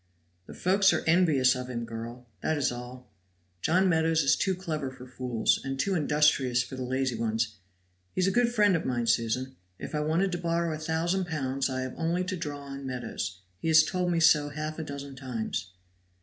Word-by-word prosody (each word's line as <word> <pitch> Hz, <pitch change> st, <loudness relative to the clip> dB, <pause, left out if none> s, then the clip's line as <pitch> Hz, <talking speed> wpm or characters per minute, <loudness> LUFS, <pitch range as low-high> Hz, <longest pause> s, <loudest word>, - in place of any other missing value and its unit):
"The -, -, -10 dB
folk 190 Hz, +3 st, +1 dB
are -, -, 0 dB
envious 160 Hz, -7 st, +4 dB
of 125 Hz, -1 st, -5 dB
him, 120 Hz, -2 st, -3 dB
girl 115 Hz, +2 st, -7 dB, 0.2 s
that 160 Hz, -, 0 dB
is 140 Hz, -, +1 dB
all. 125 Hz, +1 st, -8 dB, 0.5 s
John 185 Hz, +4 st, +3 dB
Meadows 160 Hz, -2 st, +3 dB
is 135 Hz, -, +4 dB
too 190 Hz, -1 st, 0 dB
clever 155 Hz, -7 st, -3 dB
for 130 Hz, -1 st, -11 dB
fools, 125 Hz, -2 st, 0 dB
and 135 Hz, 0 st, -4 dB
too 195 Hz, +8 st, +1 dB
industrious 145 Hz, -6 st, +3 dB
for 125 Hz, -, -8 dB
the 130 Hz, -, -6 dB
lazy 130 Hz, 0 st, -1 dB
ones; 110 Hz, -1 st, -1 dB, 0.6 s
he -, -, +1 dB
is -, -, +4 dB
a 195 Hz, -, +2 dB
good 240 Hz, +3 st, +3 dB
friend 210 Hz, -5 st, +4 dB
of 165 Hz, -, -1 dB
mine, 120 Hz, -2 st, -1 dB
Susan; 120 Hz, +3 st, 0 dB, 0.2 s
if -, -, -7 dB
I 150 Hz, -, 0 dB
wanted 165 Hz, +6 st, +1 dB
to 175 Hz, -, -2 dB
borrow 170 Hz, -1 st, 0 dB
a 155 Hz, -, -5 dB
thousand 165 Hz, +4 st, 0 dB
pounds 135 Hz, -4 st, -1 dB
I 130 Hz, 0 st, -2 dB
have 130 Hz, 0 st, -4 dB
only 170 Hz, +2 st, 0 dB
to 185 Hz, +1 st, -3 dB
draw 145 Hz, -4 st, -5 dB
on 140 Hz, 0 st, -8 dB
Meadows; 95 Hz, -7 st, -4 dB, 0.2 s
he -, -, -4 dB
has 160 Hz, 0 st, +7 dB
told 180 Hz, -1 st, -1 dB
me 170 Hz, -, +1 dB
so 150 Hz, -3 st, +5 dB
half 155 Hz, +2 st, -5 dB
a -, -, -2 dB
dozen 140 Hz, -2 st, -7 dB
times." 115 Hz, -6 st, -4 dB
145 Hz, 205 wpm, -28 LUFS, 125-165 Hz, 0.6 s, has